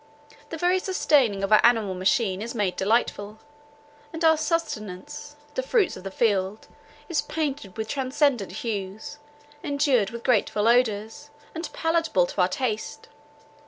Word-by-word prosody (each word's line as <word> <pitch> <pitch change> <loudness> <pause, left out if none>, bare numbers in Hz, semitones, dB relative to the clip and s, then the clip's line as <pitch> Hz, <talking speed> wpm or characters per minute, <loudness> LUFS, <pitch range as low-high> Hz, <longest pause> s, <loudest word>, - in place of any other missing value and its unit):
The 325 - -5
very 360 +3 +2
sustaining 275 - +2
of 195 - -1
our 215 - +6
animal 225 -5 +3
machine 190 +1 +1
is 235 +2 -5
made 200 -5 0
delightful; 210 0 0 0.7
and 325 0 -2
our 320 0 +6
sustenance, 295 - -4 0.2
the - - -1
fruits 475 -6 +1
of - - -10
the 195 - -4
field, 200 -1 0 0.4
is 315 -4 0
painted 290 -9 -4
with 220 0 -3
transcendant 260 -4 0
hues, 210 +5 -5 0.4
endued 280 -8 +2
with 235 0 -8
grateful 215 -3 +2
odours, 230 +2 +1 0.2
and 330 +1 -5
palatable 325 - +1
to 185 - -2
our 180 - +4
taste. 220 +2 -4
235 Hz, 140 wpm, -25 LUFS, 205-295 Hz, 0.7 s, our